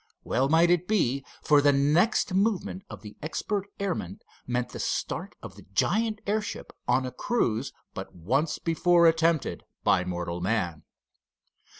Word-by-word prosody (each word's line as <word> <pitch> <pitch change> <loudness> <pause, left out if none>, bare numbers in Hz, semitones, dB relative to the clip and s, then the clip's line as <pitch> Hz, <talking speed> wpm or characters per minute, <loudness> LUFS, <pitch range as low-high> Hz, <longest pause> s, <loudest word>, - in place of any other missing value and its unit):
Well 130 +3 +1
might 165 +2 +5
it 175 0 +2
be, 140 - +1 0.2
for 145 -1 +5
the 145 0 +5
next 155 - +2
movement 195 -1 0
of - - -10
the 105 -1 -10
expert 200 +6 -2
airman 175 - -3 0.3
meant 125 0 -1
the - - -8
start - - -3
of - - -9
the - - -14
giant 220 - +1
airship 210 +1 -3
on 125 +2 +2
a 130 - -4
cruise 125 - -1 0.2
but - - -7
once 130 - 0
before 170 +1 +3
attempted 165 -1 +2 0.2
by 90 - +3
mortal 90 -1 -4
man. 90 -6 -1
150 Hz, 150 wpm, -27 LUFS, 120-180 Hz, 0.3 s, might